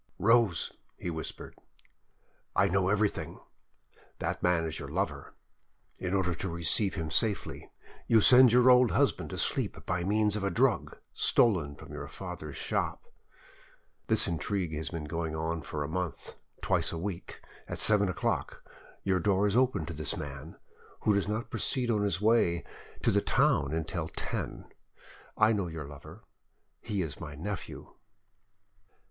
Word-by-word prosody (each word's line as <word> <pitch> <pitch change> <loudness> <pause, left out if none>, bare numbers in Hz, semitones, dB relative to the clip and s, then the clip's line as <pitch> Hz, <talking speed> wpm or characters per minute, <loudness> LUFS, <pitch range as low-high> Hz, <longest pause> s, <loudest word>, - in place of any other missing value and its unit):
"Rose," 115 -7 +3 0.3
he 90 - -4
whispered, 80 -1 -6 1.0
"I - - +4
know 95 0 +2
everything: 105 0 0 0.8
that - - -3
man 90 -2 +2
is 80 - -4
your - - -7
lover. - - -3 0.6
In 90 +1 -1
order 90 -2 +1
to 95 +3 -4
receive 85 +4 +1
him 80 -2 -4
safely, 110 -4 -1 0.4
you 115 - +6
send 125 +3 +7
your 125 +1 +6
old 125 -1 +6
husband 85 - +1
to - - -6
sleep - - -1
by 90 0 -1
means 105 +2 +2
of 105 - -3
a 100 - +1
drug 125 +1 +1 0.2
stolen 85 -11 +2
from - - -12
your - - -6
father's 75 -2 -7
shop. - - -2 1.0
This - - +6
intrigue 85 +1 -2
has 75 0 -3
been 85 -2 -5
going 80 +1 -3
on 80 +1 -2
for 75 0 -4
a - - -4
month; 90 +2 -4 0.3
twice - - +2
a 85 - -4
week, 90 +1 -5 0.3
at - - -5
seven 105 -2 +3
o'clock, 90 - -2 0.4
your 95 -1 +2
door 100 +2 +2
is 105 0 +1
opened 125 - +2
to - - -4
this 75 -1 -2
man, 75 -4 -7 0.5
who 105 - +3
does 100 0 +1
not 110 +3 -3
proceed 125 -2 0
on 105 -2 +1
his 100 -4 0
way 105 -6 +3 0.4
to - - +4
the - - +3
town 70 0 +2
until 80 +1 -2
ten. - - -5 0.7
I 110 +1 +5
know 100 -4 -1
your 80 -3 -6
lover: 70 0 -12 0.6
he 105 -4 -2
is 75 -5 -6
my 75 -3 -7
nephew." 100 +7 -6
90 Hz, 155 wpm, -30 LUFS, 80-105 Hz, 1.0 s, send